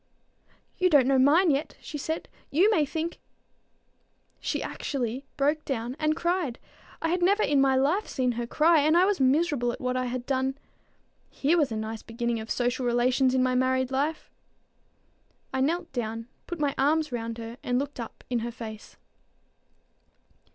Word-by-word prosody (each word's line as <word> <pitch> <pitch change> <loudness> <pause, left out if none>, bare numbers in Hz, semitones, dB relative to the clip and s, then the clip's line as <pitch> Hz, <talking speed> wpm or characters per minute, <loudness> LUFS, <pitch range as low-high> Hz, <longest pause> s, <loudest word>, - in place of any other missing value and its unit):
"You 365 0 +4
don't 290 -6 +5
know 265 0 +3
mine 315 +6 +5
yet," 285 +2 -2
she 295 - -7
said. 320 +3 -3 0.2
"You 370 +9 +4
may 310 -8 +2
think" 325 +3 -4 1.2
She - - -2
actually 260 -1 -3
broke 295 +2 +1
down 245 -1 -3
and 310 0 +1
cried. 340 -7 -1 0.5
I 325 - +1
had 355 +2 0
never 400 +4 +3
in 280 -1 +3
my 270 -1 +4
life 300 +11 +2
seen 255 -1 0
her 235 0 -4
cry, 315 +5 +4
and 310 +3 +4
I 360 - +6
was 405 0 +1
miserable 270 -2 +2
at - - -7
what 250 0 -1
I 255 0 0
had 245 0 -4
done. 265 0 -1 0.7
Here 295 +5 +1
was 300 -7 +2
a - - -2
nice 220 0 -4
beginning 235 0 -2
of 220 +1 -8
social 245 +1 0
relations 250 +2 +2
in 255 - +3
my 255 0 +1
married 260 0 +1
life! 290 +4 -2 1.2
I 265 - 0
knelt 335 +4 -1
down, 230 -2 -3 0.2
put 345 -2 -5
my 285 -2 +1
arms 305 +2 +2
round 230 -1 -4
her, 230 +1 -7
and 245 0 0
looked 280 0 -3
up 230 - -8
in 245 -2 0
her 235 +1 -4
face. 220 -2 -9
265 Hz, 175 wpm, -27 LUFS, 245-310 Hz, 1.2 s, I